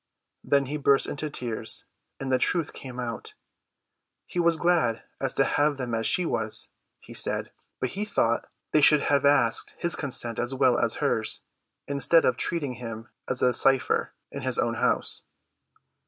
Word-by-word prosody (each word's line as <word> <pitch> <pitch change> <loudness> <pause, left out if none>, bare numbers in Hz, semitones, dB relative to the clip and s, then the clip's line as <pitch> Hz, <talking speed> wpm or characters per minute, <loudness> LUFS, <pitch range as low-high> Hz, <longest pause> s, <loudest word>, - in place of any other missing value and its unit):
Then 140 -1 +2
he 145 +3 -4
burst 140 -1 +3
into 150 +1 -4
tears, 120 -5 0 0.4
and 135 -1 -3
the 130 - +3
truth 170 -4 0
came 125 -2 -8
out. 120 -2 -6 0.9
He 180 - -4
was 170 -1 +4
as - - -9
glad 165 -10 +1 0.3
to - - +4
have 145 -1 +1
them 125 -3 -4
as 115 -1 +1
she 180 - +4
was, 110 -8 +1 0.3
he - - -13
said, - - -1 0.3
but 130 - -1
he 200 +9 -4
thought 115 - 0 0.2
they 155 - +4
should 150 0 +6
have 140 -1 +2
asked 135 -5 +2
his 170 0 +1
consent 120 -5 -3
as 120 +2 -2
well 130 -2 +3
as - - +1
hers, - - 0 0.5
instead 140 +4 +3
of 130 - +3
treating 145 -6 -1
him 115 -1 -7 0.2
as - - -1
a 125 - +4
cypher 135 +2 +2 0.2
in - - -6
his - - -1
own - - +1
house. - - 0
135 Hz, 170 wpm, -26 LUFS, 120-150 Hz, 0.9 s, should